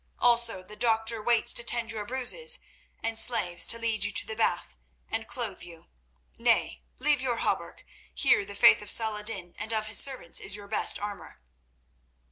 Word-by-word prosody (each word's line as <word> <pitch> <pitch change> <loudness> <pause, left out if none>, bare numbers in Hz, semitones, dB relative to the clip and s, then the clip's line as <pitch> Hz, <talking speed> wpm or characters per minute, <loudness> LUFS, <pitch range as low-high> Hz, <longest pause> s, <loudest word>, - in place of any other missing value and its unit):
Also 235 -5 +2
the 210 +3 -11
doctor 225 0 0
waits 235 +1 +2
to - - 0
tend 235 -1 0
your 215 -2 -5
bruises, 265 - +1 0.5
and 225 0 0
slaves 180 -8 +3
to 230 - +2
lead 230 -2 -1
you 205 - +1
to - - +2
the 220 - -7
bath 225 - -1 0.4
and 225 0 -4
clothe 225 -6 -5
you. 170 -2 -11 0.5
Nay, - - +1 0.2
leave 295 -2 +2
your 245 -3 -1
hauberk; - - -3 0.3
here 425 -2 +2
the 395 - -9
faith - - +6
of - - -4
Salah 220 -2 +4
ed 210 - -9
din 190 -6 -3
and 220 - -5
of 215 -1 -1
his 215 -1 -1
servants 260 -11 -3
is 195 - -3
your 205 -1 -10
best 210 - +2
armour." 205 - -8
225 Hz, 185 wpm, -27 LUFS, 205-240 Hz, 0.5 s, faith